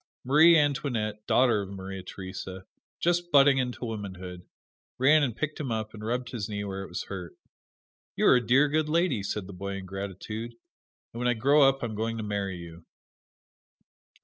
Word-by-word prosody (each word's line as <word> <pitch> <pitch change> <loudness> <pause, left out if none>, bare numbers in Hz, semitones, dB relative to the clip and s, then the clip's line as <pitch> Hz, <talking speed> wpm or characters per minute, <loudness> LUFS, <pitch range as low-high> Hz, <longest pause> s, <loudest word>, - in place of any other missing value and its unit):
Marie 160 +5 +7
Antoinette, 125 -8 -1
daughter 120 -5 +4
of 95 - -7
Maria 95 0 -7
Theresa, 95 0 -8 0.3
just 175 0 0
budding 140 -1 +6
into 125 -1 -3
womanhood, 95 -5 -7 0.5
ran 150 +4 +5
and 120 -5 -1
picked 155 0 -3
him 135 -5 -3
up 110 -1 -3
and 105 -1 -9
rubbed 125 +3 -2
his 110 -4 -4
knee 100 -1 -3
where 95 -1 -4
it 95 - -7
was 90 - -4
hurt. 90 -5 -7 0.8
"You - - +1
are - - +7
a - - +1
dear, 130 +5 +4
good 155 +1 0
lady," 165 - +1
said 100 0 -3
the 100 - -10
boy 100 +2 -5
in 95 -1 -6
gratitude, 100 +5 -6 0.6
"and 115 - -6
when 125 - 0
I 125 - +2
grow 140 +6 +4
up 135 -1 -3
I - - +1
am 110 - -4
going 115 +2 -2
to 110 - -4
marry 100 -2 -2
you." 85 0 -11
110 Hz, 190 wpm, -28 LUFS, 95-135 Hz, 0.8 s, Marie